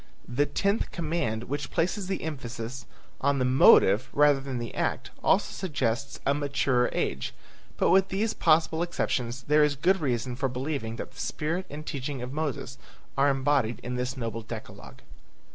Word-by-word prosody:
The 140 +4 +1
tenth 200 +8 0
command 155 -10 -2
which 145 +4 -4
places 185 +3 -1
the 190 -1 -2
emphasis 125 -4 -5 0.3
on 140 +1 +2
the 130 - +1
motive 125 -3 +6
rather 145 -1 +5
than 135 -2 -4
the 120 -1 -5
act - - -2
also - - +3
suggests 140 -6 -2
a 140 - +3
maturer 140 -3 +1
age; 65 -1 -2 0.4
but - - +3
with 190 0 +5
these 205 +4 -1
possible 160 0 +3
exceptions 130 -7 -2
there 150 +2 +4
is 150 -1 +2
good 180 +6 +2
reason 125 -3 -1
for 135 +1 -1
believing 125 -3 -3
that - - -6
the - - -15
spirit 170 +5 -2
and 150 +1 -7
teaching 140 -2 -4
of 125 +2 -6
Moses 145 -3 -3 0.4
are 140 +1 +4
embodied 135 -4 +1
in 125 +1 -3
this 125 +2 -2
noble 115 -2 -3
decalogue. 115 0 -9
140 Hz, 165 wpm, -28 LUFS, 125-155 Hz, 0.4 s, motive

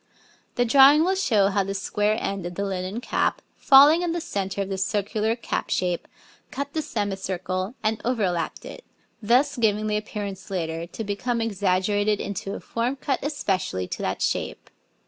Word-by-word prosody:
The 245 - +2
drawing 275 +5 +7
will 370 +3 +2
show 220 - +2
how 200 0 +1
the 195 +1 -4
square 210 +2 0
end 195 -3 -3
of 175 - -8
the 200 - -2
linen 190 +3 -3
cap, - - 0 0.2
falling 290 +4 +7
in 345 -2 -1
the 345 - -1
centre 200 - -3
of 195 - -8
the 190 -1 -3
circular 210 +3 0
cap 235 - -3
shape, 180 -2 -1 0.4
cut 280 +1 -5
the 315 - 0
semicircle 195 - -3
and 215 0 0
overlapped 190 -9 -1
it, - - -9 0.4
thus 255 +6 +3
giving 215 -2 +2
the 210 0 0
appearance 205 -3 -6
later 165 -3 -3
to 225 - -6
become 225 +4 -2
exaggerated 205 0 +1
into 200 0 -4
a - - -6
form 240 +3 -2
cut 270 0 -2
especially 190 - -2
to - - -5
that - - -2
shape. - - -2
210 Hz, 170 wpm, -24 LUFS, 190-245 Hz, 0.4 s, drawing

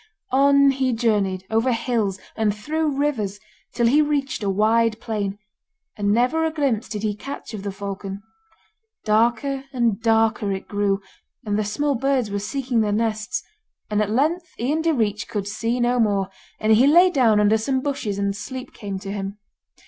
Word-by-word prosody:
On 280 +1 +5
he 260 -2 0
journeyed, 205 -5 0
over 225 +3 +2
hills, 230 -5 0 0.2
and 210 -2 +1
through 300 +5 -1
rivers 220 -9 -1 0.3
till 235 -1 0
he 280 +6 +5
reached 290 -4 -1
a 200 - -1
wide 220 +3 +2
plain, 205 -3 -3 0.6
and 205 -1 0
never 250 +9 +2
a 320 - +2
glimpse 275 -7 -1
did 210 -1 -4
he 210 -1 0
catch 275 +2 -8
of 210 - -5
the 200 0 -4
falcon. 195 0 -6 0.8
Darker 235 +5 +1
and 235 -5 0
darker 225 -2 +2
it 190 - -6
grew, 200 -1 0 0.4
and 205 -1 -1
the 215 - +1
small 280 +8 0
birds 260 -3 0
were 200 - -1
seeking 245 +2 -1
their 210 -1 0
nests, 215 0 -1 0.5
and 210 0 +2
at 210 - 0
length 315 +10 0
Ian 285 +7 0
Direach 225 -11 0
could 200 -2 -3
see 230 +4 -2
no 245 +1 +2
more, 200 -4 +1 0.3
and 220 0 +3
he 240 +5 +5
lay 350 +5 +6
down 235 -8 +4
under 210 +1 +4
some 260 +4 0
bushes 260 -7 -3
and 200 0 -1
sleep 250 +5 -7
came 200 -3 -5
to 195 +1 -6
him. 200 0 -4
225 Hz, 175 wpm, -23 LUFS, 205-265 Hz, 0.8 s, lay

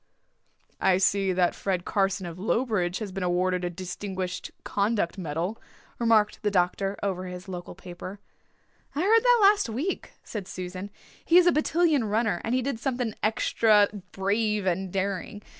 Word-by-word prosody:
"I 185 - +4
see 195 0 +2
that 180 -1 +2
Fred 185 -3 -2
Carson 195 -1 0
of 170 0 -7
Lowbridge 205 -4 0
has 210 -4 -5
been 195 +1 -5
awarded 180 0 +1
a 175 - 0
Distinguished 185 +1 -5
Conduct 200 -3 0
Medal," 170 +5 -3 0.4
remarked 225 -3 +3
the 210 - +1
doctor, 195 +1 0
over 185 -2 -2
his 180 +1 -8
local 180 -1 -7
paper. 185 +2 -9 0.8
"I 295 - 0
heard 445 +5 +5
that - - +5
last 405 - +5
week," 280 - -3
said 205 -4 -6
Susan. 185 +2 -6 0.3
"He 340 - +5
is 360 - +7
a 350 - +6
battalion 310 -4 +2
runner 210 -3 0
and 230 +3 0
he 255 - +1
did 265 -3 -2
something 245 -3 -2
extra 215 -1 +3 0.2
brave 210 +1 0
and 185 0 -1
daring. 195 +2 -3
200 Hz, 160 wpm, -27 LUFS, 185-225 Hz, 0.8 s, is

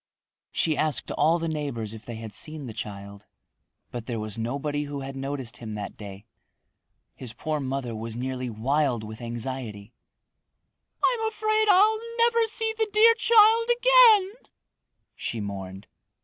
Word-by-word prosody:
She 160 -2 +1
asked 155 -1 -1
all 165 +2 +3
the 165 -1 -3
neighbors 140 -9 -4
if 110 0 -11
they 120 - -7
had 110 -1 -8
seen 155 +6 -5
the 115 - -7
child, 100 -1 -8 0.6
but 120 -2 -7
there 120 -3 -3
was 110 -1 -5
nobody 140 +6 -2
who 145 -1 -6
had 135 0 -7
noticed 135 -3 -5
him 110 -2 -7
that 105 -1 -6
day. 100 0 -10 0.9
His 120 -3 -8
poor 155 +6 -3
mother 130 -3 -3
was 110 +1 -6
nearly 130 0 -3
wild 125 +1 0
with 110 +1 -9
anxiety. 120 -3 -6 1.1
"I'm 455 -3 +1
afraid 435 0 +1
I'll 420 +3 +5 0.2
never 465 -1 +3
see 445 0 0
the 440 -1 0
dear 445 +2 +6
child 460 0 +5
again," 480 -5 +6 0.8
she 115 - -4
mourned. 95 -1 -6
135 Hz, 150 wpm, -26 LUFS, -, 1.1 s, dear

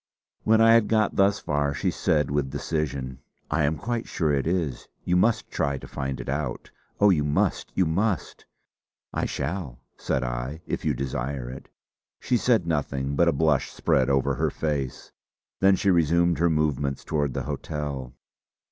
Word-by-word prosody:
When 110 +1 +5
I 115 0 +7
had 115 -2 +5
got 110 -2 +2
thus 100 +1 +4
far 70 -1 -1
she - - 0
said 75 -3 +1
with 70 -2 0
decision: 70 -5 -3 0.3
"I 75 -1 +2
am 75 +2 0
quite 120 +1 -3
sure 80 -4 0
it 70 +1 0
is. 80 -7 -1 0.2
You 90 - +2
must 110 +5 +2
try 70 -1 0
to - - -10
find 65 0 -4
it - - -7
out. 70 +2 -3 0.3
Oh, 105 0 +6
you 75 -5 +2
must, 75 0 0
you 95 - +3
must!" 95 +1 -1 0.7
"I - - -1
shall," 70 -4 -4 0.2
said 65 - -1
I, 60 +6 -4
"if - - -3
you - - +1
desire 65 -1 -3
it." 65 - -10 0.5
She 125 - 0
said 115 -6 +2
nothing, 70 -3 -1
but 85 +3 +3
a - - +5
blush 75 -1 +1
spread 65 0 +1
over 70 -1 +2
her - - 0
face. 70 -5 -3 0.5
Then 95 0 +5
she 100 +1 +2
resumed 85 0 +3
her 85 0 +3
movement 75 -3 0
towards 75 -4 -1
the - - -2
hotel. 70 -5 -5
75 Hz, 175 wpm, -26 LUFS, 70-90 Hz, 0.7 s, I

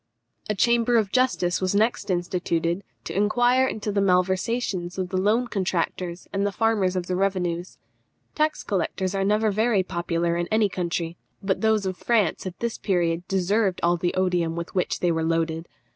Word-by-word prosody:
A 210 - +1
Chamber 235 +3 +3
of 210 -3 +1
Justice 250 -9 +1
was 185 +1 0
next 215 -1 +1
instituted 175 0 -1 0.2
to - - -6
inquire 245 +6 +3
into 215 -3 -3
the 200 0 +1
malversations 190 0 0
of 185 -1 -2
the 185 - -2
loan 215 +6 +2
contractors 180 -3 -2
and 195 0 0
the 205 - +1
farmers 205 -4 +1
of 180 -1 -1
the 180 - -2
revenues. 180 -2 -1 0.6
Tax 305 0 0
collectors 190 0 -1
are 195 0 0
never 210 +2 +2
very 215 -1 +2
popular 170 -1 -1
in 175 0 -1
any 220 -1 +2
country, 170 -2 -3 0.3
but 190 -1 0
those 220 -2 +2
of 185 -1 -3
France 210 -3 +1
at 185 - -7
this 235 -1 -2
period 175 -3 0
deserved 195 +1 +1
all 170 +1 +4
the 175 0 -1
odium 180 -3 +1
with 170 0 -5
which 180 - -1
they 175 - +2
were 160 -1 0
loaded. 165 0 -1
185 Hz, 175 wpm, -25 LUFS, 175-210 Hz, 0.6 s, all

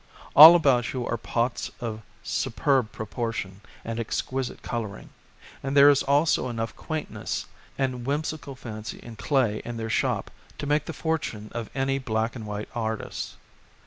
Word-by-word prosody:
All 160 +4 +12
about 135 -7 +3
you 125 -2 -2
are - - -1
pots 120 +2 -1
of 110 -2 -4 0.2
superb 130 -2 +1
proportion 110 -3 -4 0.2
and 115 0 -3
exquisite 130 +3 -3
colouring, 115 -4 -5 0.5
and 135 +1 -1
there 140 +1 +9
is 140 - +3
also 140 -1 +2
enough 115 -1 -3
quaintness 155 -2 -4 0.3
and 130 -2 -1
whimsical 145 +1 -3
fancy 110 -3 -7
in 120 -1 -10
clay 115 -3 +1
in 120 -1 -5
their 110 -1 -3
shop - - 0 0.3
to - - -4
make 150 +1 +1
the 165 - -5
fortune 150 -12 -3
of 115 -2 -4
any 135 0 0
black 110 -2 -1
and 110 -3 -7
white 105 0 -5
artist. 110 -2 -4
120 Hz, 150 wpm, -26 LUFS, 110-140 Hz, 0.5 s, All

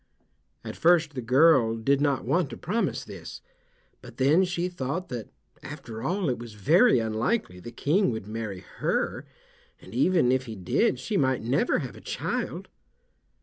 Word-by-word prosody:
At - - -7
first 165 -2 +3
the 130 - -4
girl 125 -1 +4
did 135 +5 +1
not 140 -3 +1
want 170 -4 +1
to - - -8
promise 215 +7 -1
this, - - -9 0.6
but - - -13
then 145 +8 +4
she 175 -1 -2
thought 175 +1 -4
that 120 -4 -6 0.3
after 130 -6 -8
all 180 - -1
it 125 -3 -1
was 115 -2 -9
very 170 - +4
unlikely 110 - -1
the 120 +6 -9
King 155 - +1
would 110 -4 -4
marry 105 -3 -5
her, - - -2 0.5
and - - -14
even 140 0 +3
if 130 0 +1
he 110 - -6
did 95 - +1
she 210 - -2
might 130 -7 +1
never 125 +5 +1
have - - -5
a - - -12
child. - - -3
135 Hz, 165 wpm, -26 LUFS, 115-175 Hz, 0.6 s, girl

